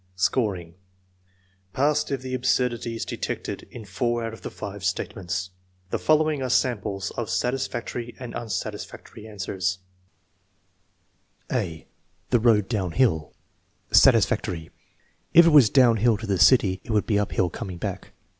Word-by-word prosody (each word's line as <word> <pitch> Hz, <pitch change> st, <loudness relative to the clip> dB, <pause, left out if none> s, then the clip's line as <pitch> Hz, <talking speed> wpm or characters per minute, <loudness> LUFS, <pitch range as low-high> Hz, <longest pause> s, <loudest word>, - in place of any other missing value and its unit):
Scoring. 95 Hz, -4 st, 0 dB, 1.0 s
Passed 150 Hz, +2 st, +1 dB
if 135 Hz, -2 st, -3 dB
the 130 Hz, 0 st, -5 dB
absurdity 125 Hz, -2 st, 0 dB
is 115 Hz, -, -4 dB
detected -, -, -5 dB
in 115 Hz, -3 st, -10 dB
four 120 Hz, +5 st, -1 dB
out 115 Hz, -, -5 dB
of 115 Hz, -, -11 dB
the -, -, -5 dB
five 100 Hz, -1 st, -8 dB
statements. 95 Hz, 0 st, -3 dB, 0.4 s
The -, -, -1 dB
following 155 Hz, -2 st, +2 dB
are 130 Hz, -, -2 dB
samples 105 Hz, -6 st, 0 dB
of 115 Hz, -4 st, -4 dB
satis 125 Hz, +9 st, 0 dB
factory 120 Hz, 0 st, -6 dB
and 125 Hz, -2 st, -7 dB
unsatisfactory 110 Hz, 0 st, -6 dB
answers: 95 Hz, -2 st, -3 dB, 1.7 s
(a) 80 Hz, -2 st, -2 dB, 0.5 s
The 120 Hz, -, +4 dB
road 110 Hz, -4 st, +3 dB
downhill 95 Hz, -, 0 dB, 0.6 s
Satisfactory. 80 Hz, -3 st, +3 dB, 0.6 s
"If 170 Hz, 0 st, +9 dB
it -, -, +6 dB
was 145 Hz, -8 st, +7 dB
downhill 120 Hz, -3 st, +4 dB
to 115 Hz, -, -7 dB
the 100 Hz, -4 st, -1 dB
city 95 Hz, -8 st, +5 dB
it -, -, -17 dB
would 105 Hz, -2 st, +1 dB
be 105 Hz, -2 st, +1 dB
uphill 95 Hz, -3 st, 0 dB
coming 95 Hz, -3 st, -6 dB
back." -, -, -5 dB
110 Hz, 135 wpm, -25 LUFS, 95-125 Hz, 1.7 s, If